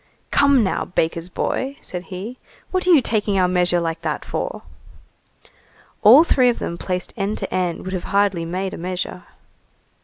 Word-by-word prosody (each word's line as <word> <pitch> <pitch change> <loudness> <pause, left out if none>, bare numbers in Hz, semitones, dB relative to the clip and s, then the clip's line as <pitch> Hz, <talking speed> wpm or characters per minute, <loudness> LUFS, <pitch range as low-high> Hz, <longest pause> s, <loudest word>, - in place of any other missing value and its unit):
"Come, 280 -4 +4
now, 190 - -1
baker's 165 0 -1
boy!" 270 +8 -2
said 180 0 -7
he, 200 +7 -7 0.3
"what 370 -1 -1
are - - +4
you 315 -7 +6
taking 205 -3 0
our 185 -1 +3
measure 180 -1 +2
like 165 -1 -3
that 155 -2 -3
for?" - - -4 1.4
All 245 +9 +9
three 255 -7 +3
of 240 - 0
them 170 - -5
placed 180 -1 -3
end 205 0 -2
to - - -5
end 180 -2 -1
would 185 - -4
have 185 - -3
hardly 200 -4 +1
made 185 +3 -3
a - - -7
measure. 180 0 -4
185 Hz, 175 wpm, -21 LUFS, 175-230 Hz, 1.4 s, All